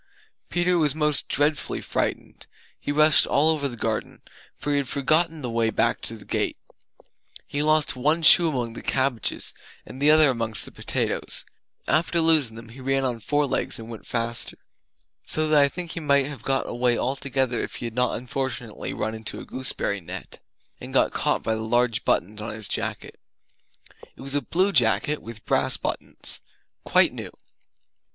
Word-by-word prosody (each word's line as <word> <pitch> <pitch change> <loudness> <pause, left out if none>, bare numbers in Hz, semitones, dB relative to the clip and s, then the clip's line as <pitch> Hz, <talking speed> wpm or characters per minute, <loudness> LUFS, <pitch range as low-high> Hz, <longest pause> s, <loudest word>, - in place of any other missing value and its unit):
Peter 175 0 +1
was 150 -2 +2
most 150 -2 +2
dreadfully 145 +1 +1
frightened; - - -3 0.3
he - - -3
rushed 155 +1 +5
all 155 +3 +4
over 150 -3 0
the 120 -3 -7
garden, 110 -1 -3 0.3
for 145 - -3
he 145 - +2
had 140 -2 -1
forgotten 155 +3 +1
the 125 - -3
way 115 -1 +1
back 115 +2 +1
to 115 - -3
the 105 - -13
gate. - - -1 0.9
He 145 +1 -3
lost 155 -1 +2
one 150 +6 +1
shoe 165 +2 +8
among 120 -6 -3
the - - -8
cabbages, 130 -5 0 0.3
and 130 - -10
the 145 - +5
other 155 -2 +6
amongst 115 -3 -1
the - - -10
potatoes. - - -2 0.4
After 170 +2 +2
losing 155 -8 +3
them, 115 0 -11
he 125 +4 -12
ran 135 +1 0
on 120 -3 -2
four 145 +6 +1
legs 135 - 0
and 115 +1 -9
went 115 - -10
faster 115 0 -1 0.7
So 155 0 +1
that 150 -1 +5
I 140 - +5
think 175 +2 -6
he - - -4
might 140 -3 +3
have 140 -4 -7
got 135 0 0
away 120 0 +1
altogether 130 -2 -1
if - - -4
he - - -5
had 115 - -5
not 125 +1 +1
unfortunately 125 -2 -4
run 110 +1 -2
into 110 -1 -5
a - - -9
gooseberry 130 -6 -2
net 90 +3 -8 0.4
And - - -8
got - - +3
caught - - 0
by 110 - 0
the 110 - -3
large 115 0 +1
buttons 105 +4 0
on 110 - -5
his 110 -2 -4
jacket. - - -3 1.0
It - - -14
was 135 +1 -3
a 145 - +2
blue 185 - +1
jacket 120 - +2
with 115 -2 -10
brass - - +2
buttons, - - -1 0.5
quite - - +4
new. - - -6
135 Hz, 180 wpm, -24 LUFS, 115-150 Hz, 1.0 s, shoe